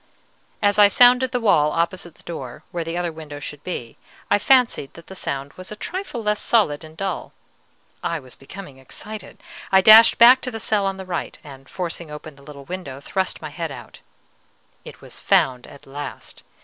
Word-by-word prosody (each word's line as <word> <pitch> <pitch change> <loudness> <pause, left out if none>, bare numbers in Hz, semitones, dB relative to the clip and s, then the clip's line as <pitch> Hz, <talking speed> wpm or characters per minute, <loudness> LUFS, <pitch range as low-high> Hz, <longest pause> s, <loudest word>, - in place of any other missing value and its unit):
As 205 0 +3
I 205 - +9
sounded 250 +4 +5
the 250 - 0
wall 155 -10 +3
opposite 170 +1 -2
the - - -21
door, 135 -8 -8
where 170 -1 -3
the 165 +1 -4
other 175 -1 -1
window 155 -2 -9
should 145 0 -8
be, 120 -10 -6 0.3
I - - +4
fancied 250 - +2
that 170 - -13
the - - -11
sound 140 -4 -4
was 185 +2 -10
a - - -5
trifle 320 - -5
less 210 0 +1
solid 170 -11 +2
and 155 0 -13
dull. 195 -2 -4 0.7
I 170 - -2
was 130 -3 -14
becoming 140 -1 -11
excited. 215 - -9 0.3
I 190 0 +6
dashed 220 +3 +8
back 250 +2 +8
to 255 - -3
the 225 -2 -6
cell 205 -3 +1
on 195 0 -3
the 190 - -8
right, 175 -2 -4
and, 135 -3 -13
forcing 170 -2 -5
open 150 0 -9
the 140 - -18
little 140 -1 -12
window, 175 -7 -7
thrust 185 +4 -3
my 155 - -5
head 165 0 -5
out. - - -11 0.8
It - - -12
was - - -9
found 125 -2 +2
at 140 - -15
last! 145 +2 -8
175 Hz, 195 wpm, -22 LUFS, 145-210 Hz, 0.8 s, I